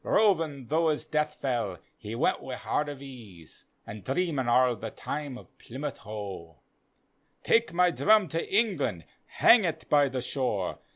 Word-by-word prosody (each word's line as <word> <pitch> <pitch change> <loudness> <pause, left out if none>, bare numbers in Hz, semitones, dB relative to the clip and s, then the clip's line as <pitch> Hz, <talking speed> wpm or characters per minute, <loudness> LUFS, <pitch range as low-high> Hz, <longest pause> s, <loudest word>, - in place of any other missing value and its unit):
Rovin' 165 - +2
tho' 160 +4 +2
his 150 - -1
death 150 0 -1
fell, 120 -9 -1 0.2
he 110 0 -7
went 120 - +1
with 130 -1 -6
wi' - - -14
heart 150 0 0
of 140 -1 -8
ease 110 - -12 0.2
An' 105 0 -8
dreamin' 135 - -1
arl 125 0 +4
the 110 +1 -6
time 140 +2 -5
o' - - -11 0.2
Plymouth 140 +4 -6
Hoc. 100 -6 -8 0.4
" - - -44
Take 230 +1 +3
my 180 +1 +3
drum 215 +1 +4
to 165 +1 -3
England, 180 - +1 0.2
hang 230 -2 +5
et 165 -3 -3
by 145 -2 +5
the 130 -1 -3
shore. 125 -9 -2
135 Hz, 170 wpm, -28 LUFS, 115-165 Hz, 0.4 s, hang